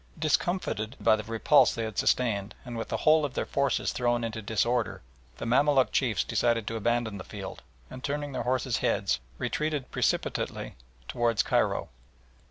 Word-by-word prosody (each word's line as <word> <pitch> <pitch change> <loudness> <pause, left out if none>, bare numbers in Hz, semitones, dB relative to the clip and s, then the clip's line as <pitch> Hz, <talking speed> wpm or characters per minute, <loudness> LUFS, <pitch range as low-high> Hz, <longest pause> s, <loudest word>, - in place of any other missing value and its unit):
Discomfited 155 - 0
by - - +4
the 105 - -5
repulse 115 0 +4
they 115 - -2
had 110 -2 -3
sustained 110 -4 +1
and 120 -1 -6
with 115 - -4
the - - -2
whole 155 0 +6
of 140 -4 -3
their - - -1
forces 140 0 0
thrown 120 -1 0
into 110 -1 -3
disorder, 115 +3 0 0.3
the - - -5
Mamaluk 135 +2 +3
chiefs 120 -5 +1
decided 115 0 +1
to 115 - -3
abandon 115 -2 0
the - - -6
field, 100 -1 -8 0.3
and 130 +1 -10
turning 145 0 -2
their 130 - -3
horses' 130 -1 0
heads - - +1 0.2
retreated 150 -4 -2
precipitately - - -1 0.3
towards 120 -2 +1
Cairo. - - +1
120 Hz, 165 wpm, -28 LUFS, 110-135 Hz, 0.3 s, whole